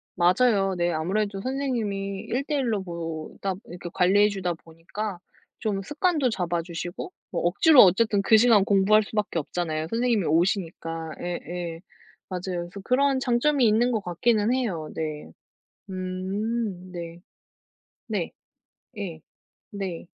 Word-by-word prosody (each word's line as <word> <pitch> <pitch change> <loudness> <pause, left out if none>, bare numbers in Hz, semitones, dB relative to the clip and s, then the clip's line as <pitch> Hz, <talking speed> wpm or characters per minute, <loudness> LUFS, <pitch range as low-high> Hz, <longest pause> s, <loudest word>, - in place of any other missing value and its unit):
맞아요. 195 +1 +3
네. 175 0 +1
아무래도 195 +5 -1
선생님이 215 -8 -2
1 260 +4 0
대1 275 -6 0
로 200 -3 -1
보다 170 +2 -4
이렇게 175 0 -7
관리해 200 +3 +4
주다 185 -3 -2
보니까 170 +4 -7 0.4
좀 200 -3 -1
습관도 295 - +1
잡아주시고 175 - -3 0.2
뭐 - - -1
억지로 250 - +6
어쨌든 205 +2 +4
그 220 +2 +6
시간 220 -4 +6
공부할 205 +1 +4
수밖에 210 -5 -2
없잖아요 160 0 -3
선생님이 230 -5 +1
오시니까. 165 -1 0
예 175 0 -3
예. 170 -2 -4 0.5
맞아요. 180 -1 -3
그래서 200 - -9
그런 270 +2 +2
장점이 255 +1 +3
있는 235 +4 +3
것 220 -3 -1
같기는 215 +6 +2
해요. 190 -12 -2
네. 155 -2 -4 0.6
음 185 +1 -3
네. 170 -1 -7 0.9
네. - - -2 0.7
예. 175 -6 -5 0.5
네. 190 -5 -5
195 Hz, 270 characters per minute, -26 LUFS, 175-225 Hz, 0.9 s, 억지로